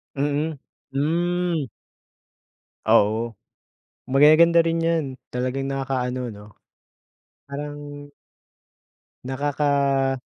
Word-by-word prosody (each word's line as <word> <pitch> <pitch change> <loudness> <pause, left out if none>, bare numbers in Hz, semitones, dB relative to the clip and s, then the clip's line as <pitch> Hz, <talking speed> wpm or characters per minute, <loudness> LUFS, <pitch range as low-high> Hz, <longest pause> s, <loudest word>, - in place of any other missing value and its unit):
Mm. 145 +2 -1 0.3
Hmm. 170 +2 0 1.2
Oo. 110 +1 +3 0.8
Magaganda 155 +5 +6
rin 165 0 0
'yan. 165 -1 +1 0.3
Talagang 130 +2 -2
nakakaano 130 -2 -2
'no. 105 -2 -10 1.0
Parang 145 +1 -7 1.3
Nakaka 140 0 +1
140 Hz, 65 wpm, -23 LUFS, 130-155 Hz, 1.3 s, Magaganda